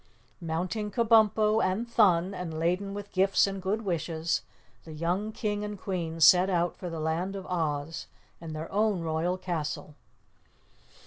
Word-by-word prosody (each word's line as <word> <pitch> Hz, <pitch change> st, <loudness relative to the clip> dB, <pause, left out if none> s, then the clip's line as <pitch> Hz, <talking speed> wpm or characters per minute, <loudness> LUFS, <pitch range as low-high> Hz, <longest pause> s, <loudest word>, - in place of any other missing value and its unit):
Mounting 180 Hz, +6 st, -2 dB
Kabumpo 220 Hz, 0 st, +4 dB
and 190 Hz, +6 st, 0 dB
Thun, 195 Hz, -5 st, +3 dB
and 175 Hz, -4 st, -5 dB
laden 180 Hz, +5 st, -1 dB
with 205 Hz, 0 st, -7 dB
gifts 195 Hz, +1 st, +3 dB
and 195 Hz, -1 st, -4 dB
good 205 Hz, +4 st, -1 dB
wishes, 165 Hz, -3 st, -1 dB, 0.4 s
the 160 Hz, -, -10 dB
young 175 Hz, +7 st, -1 dB
King 210 Hz, -1 st, -2 dB
and 210 Hz, -1 st, -5 dB
Queen 170 Hz, -4 st, -3 dB
set 180 Hz, +4 st, +7 dB
out 175 Hz, -2 st, +1 dB
for 180 Hz, -, -6 dB
the 165 Hz, -1 st, -5 dB
Land 165 Hz, +5 st, -1 dB
of 190 Hz, -1 st, -6 dB
Oz 160 Hz, -3 st, -2 dB, 0.3 s
and 160 Hz, -2 st, -6 dB
their 155 Hz, +1 st, -6 dB
own 210 Hz, -2 st, +1 dB
royal 165 Hz, +3 st, -1 dB
castle. 165 Hz, -4 st, -4 dB
180 Hz, 150 wpm, -28 LUFS, 165-205 Hz, 0.4 s, set